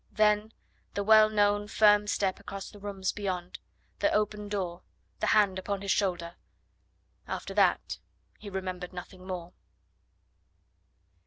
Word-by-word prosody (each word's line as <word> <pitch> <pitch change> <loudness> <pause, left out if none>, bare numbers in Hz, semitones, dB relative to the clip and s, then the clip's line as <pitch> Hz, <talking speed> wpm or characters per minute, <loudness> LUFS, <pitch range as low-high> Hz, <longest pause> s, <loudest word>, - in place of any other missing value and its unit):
Then 215 0 +3 0.4
the 200 - 0
well 215 +1 +7
known 205 -1 +2
firm 210 -1 +5
step 195 -2 0
across 195 -1 -7
the 205 - -13
rooms 195 -2 -2
beyond, 185 -3 -4 0.4
the 305 - +2
open 210 0 0
door, 180 -4 -3 0.4
the - - 0
hand 200 -3 +4
upon 200 +1 -3
his 200 - 0
shoulder. 175 -4 0 0.9
After - - -4
that - - +2 0.4
he 205 - -8
remembered 185 -2 -5
nothing 185 +1 -9
more. 180 -2 -5
200 Hz, 130 wpm, -29 LUFS, 185-210 Hz, 0.9 s, well